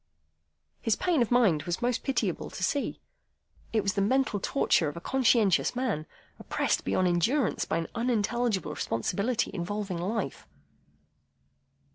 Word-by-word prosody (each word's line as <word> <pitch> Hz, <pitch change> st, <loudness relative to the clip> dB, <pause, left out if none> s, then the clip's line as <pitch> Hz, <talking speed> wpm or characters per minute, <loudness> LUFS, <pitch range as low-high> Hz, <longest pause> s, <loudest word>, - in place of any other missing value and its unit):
His 225 Hz, -, +2 dB
pain 345 Hz, -3 st, +1 dB
of 235 Hz, -, +2 dB
mind 220 Hz, -11 st, +4 dB
was 175 Hz, +1 st, -3 dB
most 245 Hz, 0 st, 0 dB
pitiable 270 Hz, -, -1 dB
to -, -, -6 dB
see. 285 Hz, -2 st, -1 dB, 0.7 s
It 220 Hz, -2 st, +1 dB
was 200 Hz, -1 st, 0 dB
the 200 Hz, -, 0 dB
mental 245 Hz, 0 st, +1 dB
torture 180 Hz, -, +2 dB
of 150 Hz, -, -9 dB
a -, -, -3 dB
conscientious 230 Hz, -2 st, +2 dB
man, 225 Hz, -12 st, -1 dB, 0.3 s
oppressed -, -, 0 dB
beyond 185 Hz, -, +1 dB
endurance 220 Hz, -, +1 dB
by -, -, -1 dB
an 165 Hz, -, -2 dB
unintelligible 230 Hz, -6 st, 0 dB
responsibility 200 Hz, -, -1 dB
involving 190 Hz, 0 st, -3 dB
life. 205 Hz, +6 st, -3 dB
215 Hz, 135 wpm, -28 LUFS, 180-245 Hz, 0.7 s, mind